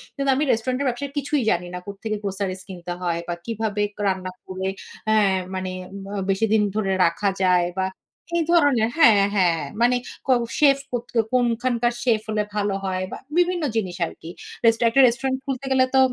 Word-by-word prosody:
কিন্তু 275 -1 -1
আমি 285 - +1
রেস্টুরেন্টের 255 +4 0
ব্যবসায় 275 +3 -4
কিছুই 285 0 0
জানি 175 -2 +1
না। - - -3
কোত্থেকে 205 +2 -4
গ্রোসারি 195 -1 -2
কিনতে 175 -1 -6
হয় 170 -2 -1
বা 175 - -1
কিভাবে 220 -2 -2 0.2
ক - - -19
রান্না 185 -1 -1 0.2
করে 190 0 -4 0.4
হ্যাঁ, 210 -3 +4 0.2
মানে 185 0 -3 0.4
আ - - -3
বেশি 195 +3 +2
দিন 220 - +4
ধরে 205 -3 0
রাখা 170 +4 +1
যায় 180 -1 +4
বা 190 - +2 0.5
এই 335 - +2
ধরনের 285 -10 +4
হ্যাঁ, 230 -10 +7
হ্যাঁ, 175 -4 +3 0.2
মানে 245 +1 +4 0.3
ক - - -9 0.3
সেফ 280 -2 +6
কত 240 -1 -2 0.3
কোনখানকার 240 0 +1
সেফ 230 -3 +3
হলে 215 -1 +1
ভালো 205 -1 0
হয় 185 0 -1
বা - - -5 0.2
বিভিন্ন 355 -1 +2
জিনিস 190 -6 -1
আরকি। 165 0 -10 0.4
রেস্টুরেন্ট 230 0 +4
একটা 270 +3 +6
রেস্টুরেন্ট 260 +2 0
খুলতে 270 -1 -3
গেলে 260 -1 +4
তো 265 - +6
220 Hz, 180 wpm, -23 LUFS, 190-255 Hz, 0.5 s, হ্যাঁ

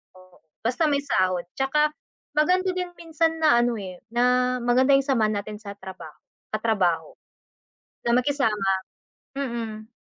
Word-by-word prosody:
oo, 185 -1 -19 0.3
basta 255 +7 +1
may 285 -1 +1
sahod. 185 -8 +1
Tsaka 300 +3 +2 0.5
maganda 370 +4 +3
din 360 -1 -3
minsan 325 0 0
na 295 -6 +5
ano 240 -1 +2
eh, 185 -3 -7
na 250 +1 +3
maganda 260 +3 +4
yung 275 0 +2
samahan 215 -6 +2
natin 210 0 -7
sa 200 -2 -8
trabaho, 185 -5 -10 0.4
katrabaho 190 -7 +1 0.9
na 235 +1 +4
makisama, 235 -7 +1 0.7
mm. 230 -4 -4
240 Hz, 130 wpm, -25 LUFS, 205-280 Hz, 0.9 s, na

